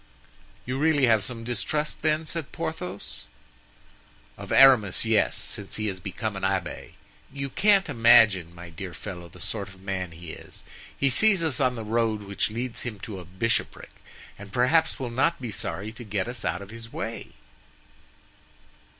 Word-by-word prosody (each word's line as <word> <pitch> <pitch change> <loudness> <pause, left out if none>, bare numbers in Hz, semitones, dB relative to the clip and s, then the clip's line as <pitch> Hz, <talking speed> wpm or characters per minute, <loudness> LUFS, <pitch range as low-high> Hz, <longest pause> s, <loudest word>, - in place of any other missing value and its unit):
"You 130 +2 -2
really 150 -3 +4
have 110 -4 +4
some 115 +1 -5
distrust, 125 +6 -2
then?" 155 +1 +1
said 160 -2 -4
Porthos. 105 - -5 1.1
"Of - - -9
Aramis, 120 -8 +6
yes, 110 -2 +2
since 100 -2 -4
he 110 - -2
has 95 -2 -5
become 100 +3 -4
an 95 - -5
abbé. 95 -2 -2 0.4
You 140 -1 -5
can't 200 +2 +4
imagine, 115 - +5
my 85 0 -10
dear 90 +1 -7
fellow, 90 -4 -8
the - - -15
sort - - -4
of 95 0 -14
man 95 -2 -3
he 85 0 -9
is. - - -11 0.3
He 140 -1 +2
sees 200 - +4
us 150 -6 0
on 130 -2 +2
the 115 - -5
road 110 -1 0
which 100 +1 -1
leads 115 +2 -4
him 115 -4 -5
to 105 -4 -6
a 90 - -10
bishopric, 95 +7 -2 0.5
and 100 0 -10
perhaps 145 +8 +3
will 125 -3 -4
not 145 +8 +1
be 120 -4 -5
sorry 95 +3 -3
to 120 +2 -10
get 105 -2 -2
us 120 -2 -4
out 90 +4 -1
of 100 - -12
his 115 0 -9
way." 115 - -5
115 Hz, 170 wpm, -26 LUFS, 95-130 Hz, 1.1 s, Aramis